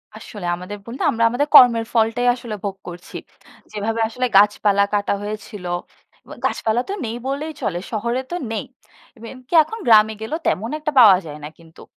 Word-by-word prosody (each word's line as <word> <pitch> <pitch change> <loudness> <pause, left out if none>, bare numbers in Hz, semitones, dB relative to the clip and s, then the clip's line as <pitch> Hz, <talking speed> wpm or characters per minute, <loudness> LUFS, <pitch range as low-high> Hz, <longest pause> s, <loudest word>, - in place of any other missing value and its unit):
আসলে 210 -3 -9
আমাদের 180 +4 -8
বন্দে 235 +3 -6
আমরা 230 0 -1
আমাদের 245 +5 -1
কর্মের 235 -4 +7
ফলটাই 230 +1 +1
আসলে 235 -3 -7
ভোগ 200 -2 -3
করছি। 175 0 -9 0.5
যেভাবে 215 +2 -3
আসলে 250 +3 -3
গাছপালা 205 0 +4
কাটা 205 -1 0
হয়েছিল 205 -2 -7 0.6
ব - - -18 0.2
গাছপালা 225 +2 0
তো - - -2
নেই 225 +1 -4
বললেই 290 +4 -3
চলে। 175 -3 -2
শহরে 235 +3 -2
তো - - -2 0.2
নেই। 225 - -3 0.6
মে 230 - -8 0.2
কি - - -11
এখন 445 +9 -8
গ্রামে 220 -1 +6
গেলেও 265 +9 -4
তেমন 220 +5 -1
একটা 300 0 -2
পাওয়া 205 -6 +8
যায় 150 -1 -8
না 150 - -6
কিন্তু। 165 -1 -18
220 Hz, 175 wpm, -20 LUFS, 205-240 Hz, 0.6 s, পাওয়া